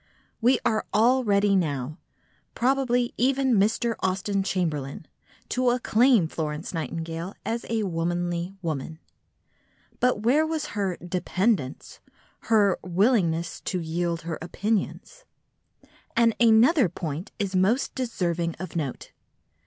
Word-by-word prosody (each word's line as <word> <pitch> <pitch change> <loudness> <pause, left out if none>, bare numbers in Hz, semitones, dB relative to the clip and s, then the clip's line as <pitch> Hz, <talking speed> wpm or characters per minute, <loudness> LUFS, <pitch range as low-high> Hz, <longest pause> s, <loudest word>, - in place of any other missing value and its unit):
We 245 +3 +4
are 220 -2 +1
all 250 +5 +4
ready 200 -2 +3
now—probably 235 - -2
even 265 +1 +2
Mr. 220 +3 +2
Austen 195 +1 0
Chamberlain—to 170 - -3
acclaim 245 -4 +3
Florence 155 +1 -4
Nightingale 165 +3 -4
as 230 +1 -3
a 225 -1 0
womanly 175 0 -2
woman. 160 -1 -3 1.0
But 245 -4 +1
where 275 +7 +4
was 315 -1 -2
her 195 -4 -1
"dependence," 180 - -1 0.5
her 205 -4 +4
"willingness 180 -3 +1
to 185 - -1
yield 170 0 -2
her 165 -2 -4
opinions"? 215 - -3 0.9
And 230 -1 +4
another 235 - +5
point 160 +3 -5
is 195 -3 -2
most 200 +8 +2
deserving 175 -9 -2
of 185 +1 -7
note. 145 -6 -4
195 Hz, 105 wpm, -26 LUFS, 170-235 Hz, 1.0 s, another